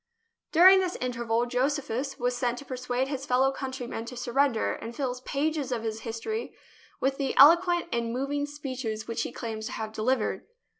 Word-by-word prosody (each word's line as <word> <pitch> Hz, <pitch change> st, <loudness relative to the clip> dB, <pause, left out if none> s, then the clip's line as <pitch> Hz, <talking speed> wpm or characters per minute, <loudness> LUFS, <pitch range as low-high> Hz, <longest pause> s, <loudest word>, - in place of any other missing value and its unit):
During 375 Hz, +4 st, +8 dB
this 365 Hz, -1 st, -1 dB
interval 235 Hz, -1 st, -1 dB
Josephus 270 Hz, +1 st, -1 dB
was 245 Hz, -1 st, 0 dB
sent 245 Hz, 0 st, -1 dB
to 280 Hz, -, -9 dB
persuade 250 Hz, 0 st, -2 dB
his 275 Hz, -1 st, -4 dB
fellow 260 Hz, +2 st, +3 dB
country 265 Hz, -2 st, -5 dB
men 225 Hz, -1 st, -5 dB
to 250 Hz, +1 st, -8 dB
surrender, 245 Hz, 0 st, +1 dB
and 230 Hz, +1 st, -7 dB
fills 250 Hz, -2 st, -3 dB
pages 290 Hz, +1 st, -1 dB
of 235 Hz, -2 st, -2 dB
his 220 Hz, -1 st, -3 dB
history 230 Hz, -, -4 dB, 0.4 s
with 270 Hz, +1 st, 0 dB
the 270 Hz, -2 st, -1 dB
eloquent 345 Hz, +4 st, +7 dB
and 235 Hz, -1 st, -1 dB
moving 280 Hz, +3 st, -1 dB
speeches 260 Hz, -7 st, -5 dB
which 230 Hz, 0 st, -2 dB
he -, -, -3 dB
claims 220 Hz, -3 st, -5 dB
to -, -, -6 dB
have 220 Hz, 0 st, -5 dB
delivered. 230 Hz, +2 st, -1 dB
255 Hz, 180 wpm, -28 LUFS, 235-280 Hz, 0.4 s, During